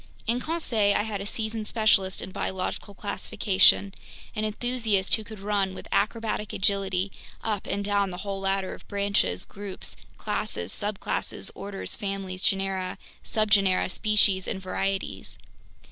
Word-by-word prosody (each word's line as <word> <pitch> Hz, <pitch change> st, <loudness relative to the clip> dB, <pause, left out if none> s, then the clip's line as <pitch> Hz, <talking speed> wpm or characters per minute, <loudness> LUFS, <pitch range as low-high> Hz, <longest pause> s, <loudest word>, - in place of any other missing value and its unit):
In 235 Hz, +2 st, +1 dB
Conseil 235 Hz, -10 st, +1 dB
I -, -, +3 dB
had 210 Hz, -2 st, -3 dB
a 200 Hz, -, -4 dB
seasoned 220 Hz, 0 st, -2 dB
specialist 200 Hz, -4 st, +3 dB
in 190 Hz, -, -7 dB
biological 190 Hz, +1 st, -3 dB
classification, 200 Hz, -1 st, +3 dB, 0.4 s
an 215 Hz, 0 st, 0 dB
enthusiast 215 Hz, -3 st, +1 dB
who 220 Hz, -, +4 dB
could 215 Hz, -1 st, -10 dB
run 195 Hz, -1 st, 0 dB
with -, -, -8 dB
acrobatic 215 Hz, -1 st, 0 dB
agility 195 Hz, -1 st, +1 dB, 0.3 s
up 210 Hz, -3 st, -2 dB
and 200 Hz, 0 st, -1 dB
down 200 Hz, -1 st, +2 dB
the 180 Hz, -, -6 dB
whole 195 Hz, -1 st, -2 dB
ladder 195 Hz, 0 st, 0 dB
of -, -, -12 dB
branches, 200 Hz, -, +1 dB
groups, 200 Hz, -1 st, -6 dB, 0.2 s
classes, 85 Hz, +1 st, -2 dB
subclasses, 205 Hz, -1 st, -1 dB
orders, 200 Hz, -1 st, -4 dB
families, 195 Hz, -2 st, -4 dB
genera, 195 Hz, -1 st, +1 dB, 0.3 s
subgenera, 200 Hz, -4 st, +3 dB
species, 200 Hz, -3 st, +3 dB
and 190 Hz, -, -2 dB
varieties. 195 Hz, +1 st, -3 dB
200 Hz, 135 wpm, -27 LUFS, 190-215 Hz, 0.4 s, who